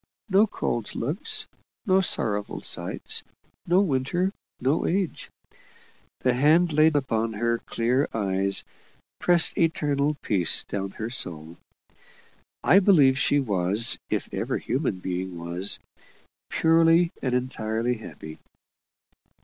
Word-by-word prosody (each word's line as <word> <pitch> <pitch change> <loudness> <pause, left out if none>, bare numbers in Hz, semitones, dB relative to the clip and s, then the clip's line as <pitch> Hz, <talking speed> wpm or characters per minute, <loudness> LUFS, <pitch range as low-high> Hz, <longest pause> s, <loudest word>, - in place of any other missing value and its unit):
No 200 +3 +4
cold 120 - -3
looks 145 - -1 0.4
no 190 -2 +3
sorrowful 105 - 0
sights - - -2 0.5
no 180 +3 +4
winter 175 +3 0 0.3
no 135 +6 0
age. 185 -1 -2 0.9
The 125 - +2
hand 155 +6 +3
laid 155 +1 +4
upon 115 -5 0
her 115 +2 -1
clear 125 +6 -1
eyes 100 -2 0 0.6
pressed 175 -2 +3
eternal 150 -3 +1
peace 95 -7 +3
down 95 -1 -4
on - - -6
her 110 +1 -5
soul. 85 -8 -5 1.1
I 195 - +6
believe 155 -10 +5
she 145 +1 +2
was, 100 -2 +1
if - - -2
ever - - -2
human 130 -7 -2
being 90 0 -4
was, 85 +3 -2 0.7
purely 165 +1 +3
and 125 -2 -1
entirely 120 -1 -2
happy. 80 -7 -10
130 Hz, 115 wpm, -25 LUFS, 105-160 Hz, 1.1 s, I